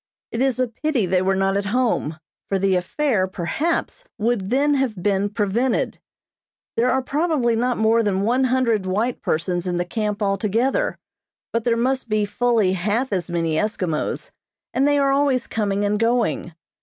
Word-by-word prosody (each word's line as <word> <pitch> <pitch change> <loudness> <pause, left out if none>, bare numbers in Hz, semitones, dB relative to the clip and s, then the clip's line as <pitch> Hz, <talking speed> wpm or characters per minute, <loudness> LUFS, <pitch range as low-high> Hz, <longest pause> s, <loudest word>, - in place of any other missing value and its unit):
It 230 - -2
is 265 -2 +1
a 255 - +2
pity 245 0 -1
they 180 0 +2
were 190 +1 +1
not 195 0 +1
at 200 0 -2
home, 220 -9 0 0.3
for 195 - +1
the 195 0 +2
affair, 190 +2 0
perhaps, 285 - -2
would 215 -3 0
then 280 +4 +3
have 265 -5 0
been 200 0 +1
prevented. 220 +4 0 0.8
There 240 +2 +2
are 260 +1 +1
probably 285 -5 +1
not 245 +2 0
more 220 +1 +3
than 200 -3 0
one 250 +5 +2
hundred 240 -6 +1
white 220 +6 -1
persons 175 +3 -1
in 175 -1 -1
the 175 - 0
camp 210 +1 -2
altogether, 220 - 0 0.6
but 230 -1 -1
there 235 -1 +2
must 255 0 0
be 215 -1 +1
fully 220 -2 +1
half 210 +7 -1
as 180 -2 -2
many 165 -2 0
Eskimos, 185 -6 -2 0.4
and 275 +2 +2
they 290 0 +3
are 275 -1 +3
always 275 -3 +2
coming 205 -2 -1
and 205 0 0
going. 230 -7 0
220 Hz, 170 wpm, -22 LUFS, 195-255 Hz, 0.8 s, then